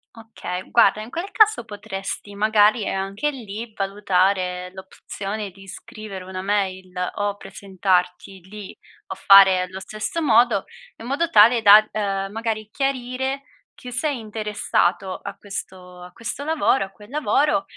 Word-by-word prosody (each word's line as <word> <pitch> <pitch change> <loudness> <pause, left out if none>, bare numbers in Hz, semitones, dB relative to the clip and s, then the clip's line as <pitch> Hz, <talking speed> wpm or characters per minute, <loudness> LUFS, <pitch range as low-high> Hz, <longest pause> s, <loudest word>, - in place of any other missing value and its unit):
Okay. 220 -5 -7
Guarda, 235 -2 +4
in 230 - -11
quel 345 +4 -4
caso 435 - +4
potresti, 205 -1 -7
magari, 215 +1 +3
ehm, - - -2
anche 195 +9 -2
lì, 225 -4 -7
valutare 185 -2 0
l'opzione 195 +2 -7
di 195 +1 -16
scrivere 195 -1 -9
una 185 0 -6
mail 190 -2 -2 0.3
o 205 0 -1
presentarti 190 -1 -2
lì 210 -2 -9 0.3
o 190 - -6
fare 195 -1 +7
allo 185 +1 -6
stesso 215 +10 -5
modo, 235 -5 +4 0.3
in 225 - -11
modo 285 +7 -1
tale 230 -4 +6
da, 215 +1 +8
uhm, 195 -2 -2
magari 220 -1 -4
chiarire 265 0 -2 0.3
chi 250 - -10
sei 280 +3 -1
interessato 210 -4 -1
a 200 0 -8
questo 185 -3 -9
a 180 0 -11
questo 235 +7 -6
lavoro 300 -7 +1
a - - -13
quel 205 +3 -17
lavoro, 295 -5 +1
205 Hz, 140 wpm, -22 LUFS, 190-230 Hz, 0.3 s, da